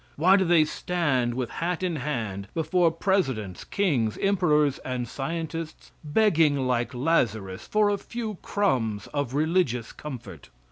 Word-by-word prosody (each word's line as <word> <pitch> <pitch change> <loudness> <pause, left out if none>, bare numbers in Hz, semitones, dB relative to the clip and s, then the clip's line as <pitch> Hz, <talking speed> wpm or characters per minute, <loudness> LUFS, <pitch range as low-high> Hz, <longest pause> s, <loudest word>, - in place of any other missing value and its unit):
Why 180 +6 +5
do 195 - +3
they 170 -3 +4
stand 145 -8 0
with 125 -2 -3
hat 175 +1 -2
in 175 -3 -1
hand 110 -9 -3
before 170 +1 +2
presidents, 135 - -1
kings, 135 - 0
emperors 155 -8 +2
and 125 -2 -4
scientists, 165 +4 -5
begging 155 -5 +3
like 125 0 0
Lazarus 110 - 0
for 210 -1 +3
a 200 - -1
few 220 -4 -5
crumbs 115 - 0
of 140 -3 -2
religious 150 -7 +1
comfort? 130 - -9
150 Hz, 135 wpm, -26 LUFS, 125-180 Hz, -, Why